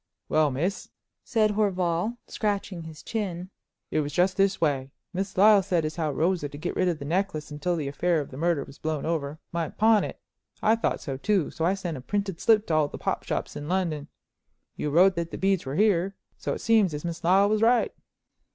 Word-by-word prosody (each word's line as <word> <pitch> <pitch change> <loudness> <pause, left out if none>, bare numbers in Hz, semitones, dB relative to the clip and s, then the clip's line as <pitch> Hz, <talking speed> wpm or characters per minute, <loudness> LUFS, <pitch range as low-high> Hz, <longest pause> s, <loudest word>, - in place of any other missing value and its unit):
"Well, 155 -1 +3
miss," 165 +10 -2 0.3
said 215 -3 +2
Horval, 195 0 0
scratching 200 -4 -2
his 160 -2 -10
chin, 190 -5 -4 0.4
"it - - +1
was 145 -1 -2
just 180 +4 +2
this 195 0 +2
way. 140 -4 0 0.2
Miss 190 +1 -3
Lyle 205 +1 +7
said 180 -4 0
as 155 +2 -4
how 155 -3 0
Rosa, 165 +1 0
to 145 - -9
get 175 +4 -4
rid 185 - +2
of 175 -3 0
the 140 - -7
necklace 160 -2 -1
until 175 +4 -1
the 150 -4 -3
affair 165 +4 +1
of 145 - -5
the 130 - -8
murder 165 -2 +1
was 140 - -14
blown 155 -2 -2
over, 155 -3 -2
might 170 -2 -3
pawn 220 -1 +5
it. - - -6 0.4
I 220 +1 +4
thought 230 - -1
so 135 -2 -4
too, 190 +1 +1
so 165 - -2
I 185 +3 +2
sent 175 -6 -4
a - - -8
printed 200 +3 -3
slip 220 -2 +4
to 165 - -2
all 155 -1 +3
the - - -8
pop - - -2
shops - - -3
in 145 +2 -6
London. 165 -6 -1 0.7
You 150 - -2
wrote 180 +5 +5
that 170 -1 -2
the - - -6
beads 190 -6 +1
were 135 - -3
here, 195 -1 +2 0.2
so - - -3
it - - -7
seems 215 -8 +3
as 150 - -6
Miss 170 0 -4
Lyle 190 +4 +5
was 215 +1 +1
right." 235 +1 +3
175 Hz, 220 wpm, -26 LUFS, 155-195 Hz, 0.7 s, Lyle